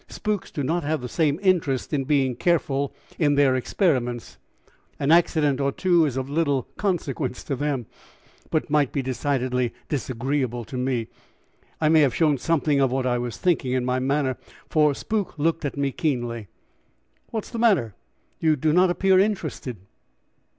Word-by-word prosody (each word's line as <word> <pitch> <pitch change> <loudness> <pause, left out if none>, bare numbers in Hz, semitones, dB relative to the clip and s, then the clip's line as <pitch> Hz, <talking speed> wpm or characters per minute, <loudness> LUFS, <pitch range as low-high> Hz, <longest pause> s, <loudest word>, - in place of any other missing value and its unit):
Spooks 210 -3 -3
do 145 - -4
not 165 +5 0
have 155 -1 -1
the 125 - -4
same 150 +3 +1
interest 160 -9 +1
in 135 -2 0
being 135 -3 +1
careful 140 -3 0 0.3
in 145 -3 +3
their 140 -2 +4
experiments 125 - -1 0.6
an 140 +1 +1
accident 155 -5 +3
or 140 0 +1
two 175 0 +3
is 135 -2 -4
of 130 0 -2
little 145 -3 +1
consequence 150 -9 -2
to 140 - -2
them, 140 -3 -2 0.6
but 155 - 0
might 150 -3 +3
be 140 - -2
decidedly 125 -1 -1 0.2
disagreeable 130 -2 -2
to 130 - -9
me. 125 -2 -1 0.7
I 155 - +2
may 160 0 +6
have 135 -5 +2
shown 150 -5 +2
something 150 -2 +1
of 135 -2 +3
what 130 0 -1
I 125 -1 +1
was 120 -1 -4
thinking 160 -8 +1
in 130 -1 0
my 125 0 0
manner, 135 0 0 0.3
for 150 -2 +3
Spook 210 -2 -3
looked 165 +1 0
at 140 - -3
me 140 -1 0
keenly. 120 - -2 0.8
"What 220 -2 -3
is - - -13
the 235 - -4
matter? 190 - +3 0.5
You 160 -1 +3
do 150 +2 +1
not 180 +2 +5
appear 190 +1 +3
interested." 175 - -1
145 Hz, 170 wpm, -24 LUFS, 130-160 Hz, 0.8 s, may